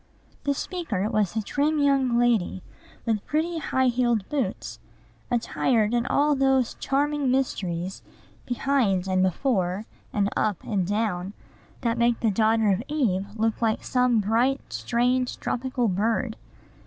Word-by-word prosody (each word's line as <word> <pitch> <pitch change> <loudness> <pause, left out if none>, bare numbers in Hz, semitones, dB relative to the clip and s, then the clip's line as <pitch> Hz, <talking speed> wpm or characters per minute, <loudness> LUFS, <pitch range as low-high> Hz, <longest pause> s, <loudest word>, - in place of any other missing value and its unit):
The 285 0 +1
speaker 275 - -2
was 210 -2 0
a 220 - 0
trim 295 +7 0
young 275 -4 +2
lady, 230 -6 +1 0.4
with 220 -4 0
pretty, 325 +2 0
high 260 -3 0
heeled 240 -4 +1
boots, 195 - -3 0.5
attired 235 -2 +1
in 240 +1 +1
all 295 +1 +3
those 265 -2 +2
charming 285 0 0
mysteries 190 -9 -1 0.5
behind 245 -7 +1
and 185 0 +2
before, 190 - 0 0.3
and 200 -1 +1
up 205 -5 0
and 195 -5 -1
down, 205 -3 -1 0.5
that 235 0 0
make 235 0 +2
the 225 - +2
daughter 220 +1 +3
of 195 +2 +1
Eve 220 -11 0
look 225 0 0
like 220 -1 +1
some 250 -2 +2
bright, 235 +7 0
strange, 250 +1 0
tropical 250 -1 -1
bird. 220 +4 0
235 Hz, 135 wpm, -25 LUFS, 205-265 Hz, 0.5 s, all